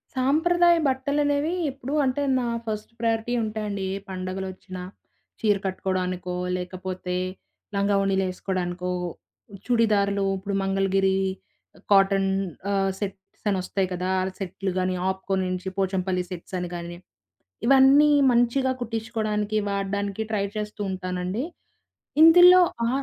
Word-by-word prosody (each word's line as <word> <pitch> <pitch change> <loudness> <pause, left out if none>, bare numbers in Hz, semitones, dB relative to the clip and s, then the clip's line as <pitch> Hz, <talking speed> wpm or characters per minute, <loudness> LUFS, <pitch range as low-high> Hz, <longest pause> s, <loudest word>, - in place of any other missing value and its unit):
సాంప్రదాయ 340 +6 +4
బట్టలనేవి, 285 +3 0 0.2
ఎప్పుడు 275 +1 -6
అంటే 260 +2 0 0.2
నా 245 - -1 0.2
ఫస్ట్ 215 -1 -4
ప్రయారిటీ 230 +1 0
ఉంటాయండి. 210 -2 -3
ఏ - - -2
పండగలొచ్చిన, 185 0 -6 0.6
చీర 210 -2 +3
కట్టుకోవడానికో, 185 -1 -2 0.2
లేకపోతే 180 0 -5 0.6
లంగావోణీలేసుకోడానికో, 190 -2 0 0.7
చుడిదార్లు 205 -4 +2
ఇప్పుడు 195 +1 -4
మంగళగిరి 195 0 +1 0.7
కాటన్ 195 -1 +4 0.4
ఆహ్, 195 -1 +1
సెట్స్ 195 0 -7
అనొస్తాయి 190 0 -1
కదా, 180 +1 -2
అలా 185 0 -3
సెట్లు 190 0 -3
గానీ 185 0 0
'ఆప్కో' 190 +1 -2
నుంచి 185 0 -3
'పోచంపల్లి' 185 -1 0
సెట్సని 180 0 -5
గానీ, 175 0 -6 0.7
ఇవన్నీ 275 +3 +6 0.2
మంచిగా 245 +2 +2
కుట్టించుకోవడానికి, 220 -2 -2
వాడడానికి 200 +1 -2
ట్రై 200 -2 +1
చేస్తూ 210 0 -5
ఉంటానండి. 185 +4 -3 0.8
ఇందులో 355 +2 +9 0.3
ఆ - - +1
195 Hz, 100 wpm, -25 LUFS, 185-230 Hz, 0.8 s, ఇందులో